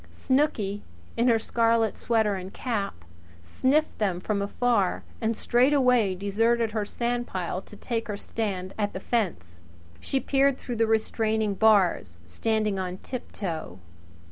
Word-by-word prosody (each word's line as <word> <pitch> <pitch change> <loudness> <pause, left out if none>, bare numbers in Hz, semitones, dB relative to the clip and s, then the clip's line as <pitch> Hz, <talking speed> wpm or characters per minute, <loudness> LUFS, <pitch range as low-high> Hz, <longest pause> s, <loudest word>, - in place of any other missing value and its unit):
Snooky, 240 -8 0 0.3
in 235 +2 +2
her 230 -2 +5
scarlet 230 -1 +1
sweater 220 -3 +1
and 190 0 -5
cap, 200 - -3 0.4
sniffed 265 - +1
them 190 -5 0
from 200 +2 -1
afar 205 -1 +1 0.2
and 225 0 0
straightway 250 -5 +3
deserted 225 +4 +1
her 215 -1 -1
sandpile 235 -7 -2
to 210 - -14
take 230 +2 -3
her 205 -2 -3
stand 195 -4 -4
at 205 -1 0
the - - -4
fence. 90 - -2 0.4
She 270 - -1
peered 275 +1 +2
through 240 -2 -5
the 225 0 +3
restraining 220 -1 +1
bars, 190 - +3
standing 210 - -1
on 185 -1 -3
tiptoe. 175 - -5
220 Hz, 135 wpm, -26 LUFS, 195-235 Hz, 0.4 s, her